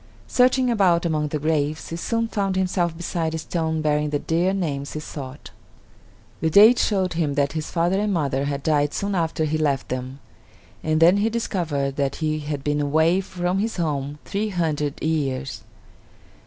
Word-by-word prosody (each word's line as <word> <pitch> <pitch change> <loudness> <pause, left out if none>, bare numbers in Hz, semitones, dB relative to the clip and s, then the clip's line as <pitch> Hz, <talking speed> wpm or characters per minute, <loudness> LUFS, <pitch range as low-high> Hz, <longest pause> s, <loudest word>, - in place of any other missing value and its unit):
Searching 255 0 +3
about 180 -6 +3
among 155 -2 0
the 150 - -2
graves, 155 0 -1
he 165 - -4
soon 230 +6 -1
found 195 -3 -1
himself 180 -3 0
beside 165 -2 -2
a - - -1
stone 160 -1 -2
bearing 150 0 +1
the 145 - 0
dear 170 +5 +1
names 145 -8 -3
he 155 - -4
sought. 140 -2 -8 0.9
The 160 - +1
date 215 +8 +7
showed 190 -4 +1
him 155 -4 -1
that 140 -1 +1
his 155 -1 -4
father 175 +3 +1
and 210 0 0
mother 140 -6 0
had 140 -1 -3
died 145 -2 +1
soon 200 0 -2
after 165 -2 0
he 155 +1 -1
left 140 -4 0
them; 130 +2 -4 0.6
and 155 0 +1
then 175 +4 +6
he 210 +2 +2
discovered 160 -12 -2
that 140 -1 0
he 155 -1 -1
had 145 -2 -4
been 145 0 0
away 160 +5 +3
from 180 0 -2
his 220 +1 -2
home 145 -4 -2
three 210 +2 -2
hundred 155 -6 -1
years. 140 -4 -1
160 Hz, 180 wpm, -23 LUFS, 145-185 Hz, 0.9 s, date